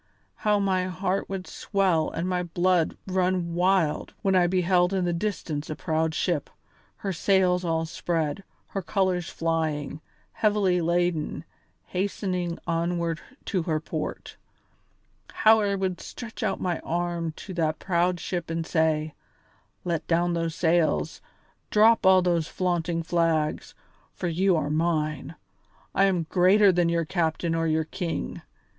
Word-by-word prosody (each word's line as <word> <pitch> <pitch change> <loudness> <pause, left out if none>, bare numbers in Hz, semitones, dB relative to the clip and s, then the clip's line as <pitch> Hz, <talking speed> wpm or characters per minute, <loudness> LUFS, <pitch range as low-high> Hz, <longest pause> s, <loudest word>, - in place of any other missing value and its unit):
How 210 -1 +2
my 190 -2 +1
heart 185 +1 -2
would 190 -1 -4
swell 185 -6 0
and 170 +2 -3
my 180 -1 0
blood 175 -1 +1
run 185 -2 0
wild 180 -3 +1
when 195 - +2
I 180 -2 +4
beheld 180 0 +2
in 185 -2 +1
the 175 - 0
distance 170 -5 -3
a 155 - -3
proud 160 0 -1
ship, 150 0 -1 0.5
her 195 -2 -4
sails 185 0 +2
all 165 -1 0
spread, 165 +1 -2 0.3
her 195 - -3
colours 185 -2 0
flying, 155 -3 -2 0.3
heavily 205 -4 +2
laden, 170 -1 0 0.4
hastening 180 -2 -2
onward 170 0 -1 0.2
to 190 -4 0
her 160 -2 -1
port. 160 - -5 0.9
How 220 0 +5
I 200 -2 +1
would 190 -2 -2
stretch 230 -2 -8
out - - -1
my 175 -2 -1
arm 170 -1 -2
to 190 - -9
that 160 -3 0
proud 175 -1 0
ship 175 -2 -4
and 165 0 -2
say: 160 -2 +1 0.7
'Let 170 -3 -2
down 175 +1 +2
those 165 -1 -2
sails, 170 -2 +1 0.5
drop 220 -1 +5
all 185 -1 +6
those 170 -3 +1
flaunting 175 -2 -1
flags, 165 -2 0 0.4
for 180 - -3
you 180 +3 +2
are 150 -2 -1
mine; 155 0 -1 0.6
I 195 - +4
am 185 -4 +1
greater 190 +4 +5
than 175 -1 +2
your 170 -1 +1
captain 165 0 0
or 165 0 0
your 160 0 +1
king! 170 +1 -4
175 Hz, 140 wpm, -26 LUFS, 165-185 Hz, 0.9 s, all